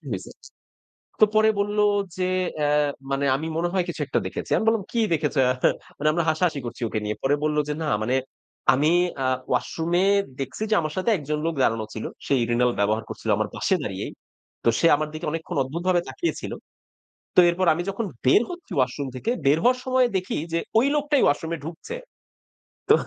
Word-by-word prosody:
"কি 150 - -18
হয়েছে?" 95 - -5 0.9
তো - - +10
পরে 220 0 +5
বলল 205 +1 0 0.4
যে 185 0 0 0.3
অ্যাঁ 150 0 +2 0.2
মানে 135 +1 0
"আমি 155 +4 -3
মনে 175 +1 0
হয় 185 -2 +1
কিছু 160 - -4
একটা - - +1
দেখেছি।" - - -6
আমি 220 - -1
বললাম, 225 -2 +3
"কি 235 - 0
দেখেছো?" 150 -3 0
এহা? 125 - +2 0.4
মানে 150 +1 +2
আমরা 170 0 +1
হাসাহাসি 160 -2 +1
করছি 120 +1 -7
ওকে 110 - -2
নিয়ে। 105 0 -2
পরে 140 +2 +3
বলল 150 0 +1
যে, 150 - 0
"না 155 - -1
মানে 125 +4 +1 0.6
আমি 150 +5 +3 0.3
আ - - +1 0.2
ওয়াশরুমে 165 +8 0 0.4
দেখছি 135 - -4
যে - - +5
আমার 155 -1 -3
সাথে 185 +5 +1
একজন 150 0 -3
লোক 165 - -1
দাঁড়ানো 110 -2 +1
ছিল। 110 - -5 0.2
সে - - 0
urinal 120 +1 +2
ব্যবহার 110 +2 +1
করছিল - - -6
আমার - - -1
পাশে - - +1
দাঁড়িয়েই। - - -4 0.5
তো - - +4
সে 165 - +5
আমার 155 +1 -2
দিকে 155 +2 -5
অনেকক্ষণ 160 -2 -4
অদ্ভুতভাবে 175 +6 0
তাকিয়ে 340 - -2
ছিল। - - -5 0.8
তো - - +7
এরপর 180 +2 0
আমি 175 - -2
যখন 200 +3 -2 0.2
বের 130 +11 +6
হচ্ছি 355 -1 -10
ওয়াশরুম 135 +1 0
থেকে 220 - -2
বের 145 +3 +5
হওয়ার 250 +1 +4
সময় 255 -1 +3
দেখি 185 - -3 0.2
যে 170 - +2 0.2
ওই 265 - +3
লোকটাই 295 -1 +2
ওয়াশরুমে 160 +3 0
ঢুকছে।" 175 - -7 0.9
তো - - +9
160 Hz, 195 wpm, -24 LUFS, 135-185 Hz, 0.9 s, তো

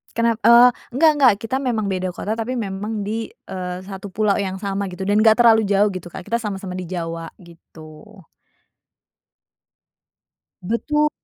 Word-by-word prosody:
Kenap 230 -1 +1
eee, 240 +1 +8 0.2
enggak 315 +3 +5
enggak, 265 -4 +6
kita 225 +3 -3
memang 235 -6 -1
beda 185 -1 -2
kota, 210 - -4
tapi 230 +3 -3
memang 210 -1 -4
di, 220 +2 -3 0.2
eee, 180 -1 -5
satu 195 +1 -8
pulau 205 +1 +1
yang 190 -1 -2
sama, 200 -1 -2
gitu, 180 +1 -6
dan 205 +1 +3
nggak 220 0 +6
terlalu 225 -3 +5
jauh, 205 +1 +3
gitu, 185 -2 -7
Kak, 175 - -9
kita 235 - 0
sama-sama 195 -4 -5
di 185 - -5
Jawa, 165 -2 -5
gitu. 170 +3 -15 2.4
Betul. 300 +9 0
205 Hz, 155 wpm, -21 LUFS, 185-225 Hz, 2.4 s, eee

